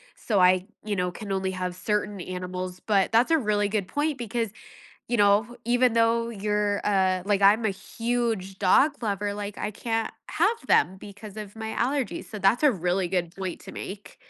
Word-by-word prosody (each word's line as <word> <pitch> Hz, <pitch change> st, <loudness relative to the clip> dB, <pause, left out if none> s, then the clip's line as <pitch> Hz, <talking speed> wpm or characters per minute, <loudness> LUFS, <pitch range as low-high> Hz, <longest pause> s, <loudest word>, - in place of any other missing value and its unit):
so 210 Hz, -4 st, 0 dB
I, 185 Hz, 0 st, +5 dB, 0.2 s
you 210 Hz, -1 st, -1 dB
know, 180 Hz, -1 st, -1 dB
can 200 Hz, +3 st, -7 dB
only 190 Hz, -1 st, -1 dB
have 180 Hz, -1 st, -3 dB
certain 205 Hz, +1 st, -2 dB
animals, 180 Hz, 0 st, -5 dB
but 195 Hz, -1 st, +1 dB
that's 235 Hz, +7 st, +4 dB
a 325 Hz, -, +6 dB
really 210 Hz, -6 st, +1 dB
good 200 Hz, -2 st, -1 dB
point 295 Hz, 0 st, -1 dB
because, 230 Hz, -2 st, -2 dB, 0.6 s
you 240 Hz, -, +1 dB
know, 210 Hz, +3 st, +3 dB
even 245 Hz, 0 st, +3 dB
though 230 Hz, 0 st, +3 dB
you're, 210 Hz, -1 st, 0 dB
uh 190 Hz, -2 st, +2 dB
like 200 Hz, 0 st, +1 dB
I'm 210 Hz, +3 st, +5 dB
a 215 Hz, -, +2 dB
huge 225 Hz, -2 st, -2 dB
dog 270 Hz, +9 st, +3 dB
lover, 205 Hz, -1 st, -1 dB
like, 205 Hz, 0 st, -5 dB
I 210 Hz, -, -2 dB
can't 225 Hz, +1 st, -2 dB, 0.2 s
have 420 Hz, -, 0 dB
them 180 Hz, +6 st, +4 dB
because 205 Hz, +1 st, -11 dB
of 210 Hz, 0 st, -8 dB
my 220 Hz, 0 st, -5 dB
allergies. 265 Hz, +1 st, -1 dB
So 215 Hz, -, -7 dB
that's 200 Hz, +6 st, +3 dB
a 295 Hz, -, +6 dB
really 180 Hz, -1 st, 0 dB
good 175 Hz, -2 st, -1 dB
point 190 Hz, -2 st, -5 dB
to -, -, -10 dB
make. 200 Hz, +1 st, -8 dB
205 Hz, 190 wpm, -26 LUFS, 190-230 Hz, 0.6 s, a